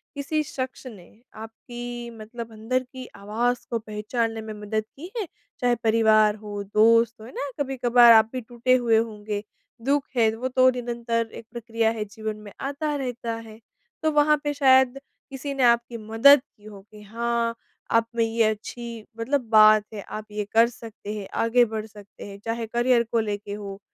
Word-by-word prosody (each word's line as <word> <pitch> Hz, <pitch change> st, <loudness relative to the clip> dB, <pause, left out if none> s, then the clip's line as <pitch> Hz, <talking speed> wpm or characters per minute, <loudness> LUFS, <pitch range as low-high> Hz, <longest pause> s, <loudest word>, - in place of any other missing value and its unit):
किसी 285 Hz, +2 st, -1 dB
शख़्स 260 Hz, -1 st, -6 dB
ने 195 Hz, -7 st, -13 dB, 0.3 s
आपकी 240 Hz, +1 st, -8 dB
मतलब 230 Hz, +1 st, -8 dB
अंदर 235 Hz, +4 st, -1 dB
की 255 Hz, 0 st, -10 dB
आवाज़ 235 Hz, +5 st, -1 dB
को 230 Hz, -, -1 dB
पहचानने 225 Hz, +1 st, -3 dB
में 220 Hz, 0 st, -7 dB
मदद 210 Hz, +1 st, -3 dB
की 340 Hz, +6 st, -9 dB
है? 420 Hz, -5 st, -2 dB, 0.3 s
चाहे 245 Hz, -1 st, +2 dB
परिवार 220 Hz, -1 st, +4 dB
हो, 205 Hz, -1 st, -6 dB
दोस्त 230 Hz, +3 st, +4 dB
हो? -, -, -10 dB
है 245 Hz, -, -11 dB
ना? 285 Hz, -, -4 dB
कभी-कभार 245 Hz, -3 st, +5 dB
आप 220 Hz, 0 st, +5 dB
भी 255 Hz, -, -3 dB
टूटे 240 Hz, +2 st, +1 dB
हुए 235 Hz, -3 st, +3 dB
होंगे। 210 Hz, -2 st, -3 dB, 0.4 s
दुःख 280 Hz, +3 st, +1 dB
है, 225 Hz, -2 st, +5 dB
वो 255 Hz, +3 st, -3 dB
तो 255 Hz, 0 st, +4 dB
निरंतर 235 Hz, -2 st, -2 dB
एक -, -, -9 dB
प्रक्रिया 230 Hz, -1 st, -1 dB
है, 225 Hz, -2 st, -3 dB
जीवन 215 Hz, 0 st, -6 dB
में 205 Hz, -1 st, -11 dB
आता 285 Hz, +2 st, -2 dB
रहता 245 Hz, -3 st, -4 dB
है। 215 Hz, +1 st, -13 dB, 0.4 s
तो 315 Hz, -, +2 dB
वहाँ 300 Hz, 0 st, +4 dB
पे 290 Hz, 0 st, -1 dB
शायद 265 Hz, -2 st, +4 dB, 0.3 s
किसी 275 Hz, +1 st, -5 dB
ने 270 Hz, -1 st, 0 dB
आपकी 235 Hz, 0 st, +3 dB
मदद 225 Hz, +6 st, +6 dB, 0.2 s
की 210 Hz, -, -21 dB
हो, 205 Hz, -2 st, -11 dB
कि 210 Hz, -1 st, -13 dB
हाँ, 230 Hz, +2 st, -1 dB, 0.4 s
आप 230 Hz, 0 st, +4 dB
में 230 Hz, -, +2 dB
ये 225 Hz, 0 st, +1 dB
अच्छी 225 Hz, +1 st, -4 dB
मतलब 265 Hz, +5 st, 0 dB
बात 215 Hz, -1 st, +7 dB
है। 210 Hz, -, -6 dB
आप 215 Hz, +2 st, -7 dB
ये 210 Hz, 0 st, -3 dB
कर 230 Hz, +1 st, +6 dB
सकते 225 Hz, -3 st, -9 dB
हैं, 195 Hz, -, -7 dB
आगे 240 Hz, +2 st, +3 dB
बढ़ 215 Hz, 0 st, -3 dB
सकते 205 Hz, -1 st, -13 dB
हैं। 200 Hz, 0 st, -10 dB
चाहे 230 Hz, 0 st, -3 dB
करियर 240 Hz, +1 st, +2 dB
को 230 Hz, -, +2 dB
लेके 205 Hz, -2 st, -3 dB
हो, 200 Hz, -1 st, -7 dB
230 Hz, 185 wpm, -25 LUFS, 215-250 Hz, 0.4 s, बात